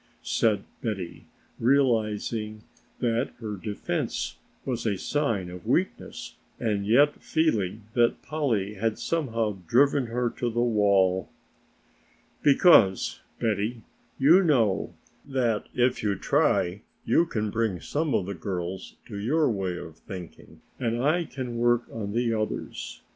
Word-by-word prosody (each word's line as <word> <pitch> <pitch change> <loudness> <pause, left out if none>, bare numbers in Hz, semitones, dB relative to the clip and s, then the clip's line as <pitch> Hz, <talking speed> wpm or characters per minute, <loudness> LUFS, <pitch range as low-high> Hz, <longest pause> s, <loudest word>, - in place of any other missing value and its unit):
said 110 -3 +1 0.2
Betty, 100 -6 -4 0.3
realizing 110 -4 +1 0.4
that 120 +1 0
her 110 -3 -4
defense 105 +1 -3 0.3
was 125 -3 -2
a 100 -3 0
sign 115 -8 -1
of 90 -1 -10
weakness - - -2 0.2
and 105 -3 -1
yet 145 +7 +4
feeling 110 - 0
that 120 -1 +2
Polly 120 -10 -1
had 110 +2 -1
somehow 115 -11 -1
driven 135 - +3
her 120 +1 -1
to 120 - -2
the 120 +1 -2
wall. 100 -5 +3 1.1
"Because, 140 - +5 0.2
Betty, 110 +1 -1 0.3
you 160 +8 +6
know 115 - +2 0.3
that 125 -6 0
if 125 0 +2
you 105 -2 0
try 90 +1 +1 0.2
you 170 - +3
can 105 -7 -2
bring 110 -5 0
some 150 - -1
of 90 - +1
the 100 - -4
girls 90 +1 -5
to 105 - -7
your 145 +6 +2
way 95 -4 -2
of 80 -2 -9
thinking 90 -2 -10 0.2
and 120 -1 -1
I 165 +4 +2
can 125 -5 -5
work 120 0 +3
on 105 -3 -4
the 120 0 +1
others. 110 -1 -4
115 Hz, 130 wpm, -27 LUFS, 100-125 Hz, 1.1 s, you